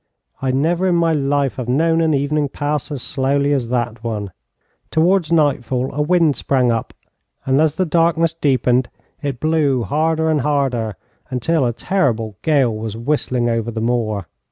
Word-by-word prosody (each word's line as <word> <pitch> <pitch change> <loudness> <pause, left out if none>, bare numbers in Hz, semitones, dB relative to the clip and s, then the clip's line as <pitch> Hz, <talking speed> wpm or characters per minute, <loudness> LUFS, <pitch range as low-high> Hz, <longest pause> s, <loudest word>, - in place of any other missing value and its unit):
I 135 - -1
never 165 +8 +1
in 180 - +2
my 170 -1 +2
life 140 -2 0
have 125 -2 -4
known 165 +5 +2
an 160 -2 +2
evening 145 +1 0
pass 145 +1 -3
as 140 -4 -4
slowly 140 +1 0
as 125 -5 -1
that 120 -2 -2
one. 105 -4 -3 0.6
Towards 170 +1 +2
nightfall 135 -5 +1
a 150 - -1
wind 165 -2 +3
sprang 130 -3 +1
up, 115 -1 -2 0.5
and 135 +2 +3
as 155 -1 +2
the 185 - +1
darkness 165 0 +2
deepened 130 -5 +1 0.3
it 140 -4 -3
blew 150 -5 +1
harder 160 +4 0
and 150 -2 +1
harder, 130 -7 0 0.3
until 130 +2 +1
a - - 0
terrible 115 - -1
gale 135 -8 +2
was 110 0 -5
whistling 125 -1 0
over 115 -1 -1
the 115 -1 -4
moor. 110 -4 -1
140 Hz, 165 wpm, -19 LUFS, 120-155 Hz, 0.6 s, wind